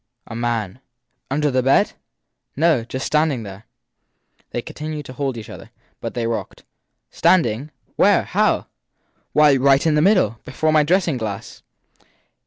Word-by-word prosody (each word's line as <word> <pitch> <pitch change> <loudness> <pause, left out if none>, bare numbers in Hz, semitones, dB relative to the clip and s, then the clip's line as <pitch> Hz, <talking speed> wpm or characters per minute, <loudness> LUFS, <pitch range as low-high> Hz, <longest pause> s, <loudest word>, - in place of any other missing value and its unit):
A 115 - -9
man/ 115 -2 -2 0.5
Under 145 +2 0
the 130 0 +2
bed? 135 +2 +3 0.6
No 155 -5 +2
just 130 +3 -5
standing 150 -6 +1
there. 100 +1 -10 0.8
They 120 - -4
continued 150 -1 -6
to 130 - -9
hold 135 -1 -3
each 110 - -8
other, - - -11 0.3
but - - -6
they 120 -1 -1
rocked. 115 0 -4 0.5
Stand 185 -6 +4
ing? 120 +6 -4 0.3
Where? - - +4
How? - - +1 0.7
Why, 150 -2 +5
right 135 +2 +3
in 160 - +3
the 150 - +3
middle 165 - +3
before 155 +4 -1
my 155 - +5
dressing 170 -1 +1
glass. 105 -4 -6
135 Hz, 150 wpm, -21 LUFS, 115-150 Hz, 0.8 s, Why